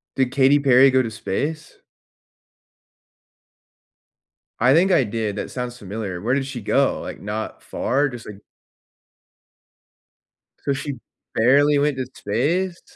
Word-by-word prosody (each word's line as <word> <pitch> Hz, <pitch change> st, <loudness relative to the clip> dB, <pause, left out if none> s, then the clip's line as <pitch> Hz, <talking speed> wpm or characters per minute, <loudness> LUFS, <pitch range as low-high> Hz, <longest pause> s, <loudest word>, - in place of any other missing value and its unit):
Did 130 Hz, -2 st, +1 dB
Katy 135 Hz, +2 st, +4 dB
Perry 135 Hz, -1 st, +5 dB
go 130 Hz, 0 st, +3 dB
to 115 Hz, -, -4 dB
space? 145 Hz, +9 st, -4 dB, 2.8 s
I 125 Hz, +3 st, +5 dB
think 185 Hz, +4 st, +4 dB
I 135 Hz, -, +4 dB
did, 110 Hz, -1 st, -3 dB
that -, -, -5 dB
sounds 125 Hz, -1 st, -5 dB
familiar. 100 Hz, -3 st, -5 dB
Where 120 Hz, +6 st, 0 dB
did 135 Hz, -1 st, -1 dB
she 135 Hz, -3 st, -6 dB
go? 100 Hz, -, +1 dB
Like, -, -, -7 dB
not 105 Hz, +2 st, -5 dB
far? 140 Hz, +3 st, 0 dB
Just 120 Hz, -3 st, -9 dB
like 105 Hz, -2 st, -9 dB, 2.2 s
So 140 Hz, -, -1 dB
she 140 Hz, +1 st, -4 dB, 0.4 s
barely 145 Hz, +5 st, +4 dB
went 145 Hz, -1 st, +1 dB
to 130 Hz, -, -2 dB
space? 170 Hz, -, -1 dB
130 Hz, 130 wpm, -22 LUFS, 110-145 Hz, 2.8 s, Perry